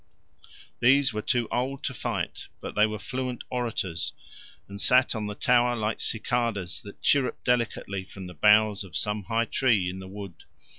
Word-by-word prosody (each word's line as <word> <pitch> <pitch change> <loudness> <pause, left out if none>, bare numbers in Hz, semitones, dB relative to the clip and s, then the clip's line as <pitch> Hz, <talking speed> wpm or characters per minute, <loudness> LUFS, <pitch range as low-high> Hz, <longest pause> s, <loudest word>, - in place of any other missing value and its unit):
These 135 +1 +4
were 105 - -2
too 120 +1 0
old 130 +3 -2
to 130 - -2
fight, - - -3
but - - -6
they 105 +1 +4
were 110 0 -4
fluent 130 +1 -4
orators, 110 -9 -2 0.5
and 100 0 -7
sat 125 0 +5
on 110 -3 -3
the 105 - -5
tower 120 +1 +3
like 110 -1 -2
cicales 110 -5 -1
that 100 - -12
chirrup 135 -3 +2
delicately 115 -5 0
from 95 0 -10
the 90 - -8
boughs 105 +4 +4
of 95 -5 -5
some 105 -1 -1
high 115 +2 +1
tree 110 -9 +2
in 95 +1 -8
a 95 - -9
wood. 100 -2 -9
110 Hz, 170 wpm, -27 LUFS, 100-125 Hz, 0.5 s, sat